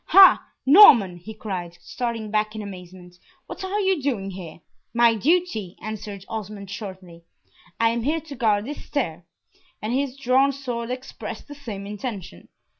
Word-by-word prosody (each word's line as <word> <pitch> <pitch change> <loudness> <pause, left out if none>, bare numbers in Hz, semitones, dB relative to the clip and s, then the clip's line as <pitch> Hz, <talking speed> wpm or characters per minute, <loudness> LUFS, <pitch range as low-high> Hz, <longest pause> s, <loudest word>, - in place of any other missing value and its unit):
"Ha! 390 -1 +8 0.2
Norman!" 260 - +8
he 175 +6 -10
cried, 180 -5 -5
starting 230 -4 -4
back 215 0 0
in 215 - -5
amazement, 180 -2 -11 0.3
"what - - -8
are 385 +2 -1
you 380 -5 +1
doing 220 -8 -2
here?" 175 -4 -9 0.4
"My 235 -1 +5
duty," 225 - 0
answered 205 -2 -7
Osmond, 210 -3 -6
shortly. 185 -5 -8 0.6
"I 230 0 +4
am 235 +1 -1
here 310 +7 0
to 295 -2 -10
guard 215 -4 +1
this 290 +3 -7
stair;" 175 - -3 0.5
and 215 +3 -3
his 270 0 -1
drawn 270 +1 +3
sword 245 -4 -4
expressed 255 +1 -7
the 290 - -8
same 220 -9 -7
intention. 200 - -7
220 Hz, 155 wpm, -24 LUFS, 195-265 Hz, 0.6 s, Ha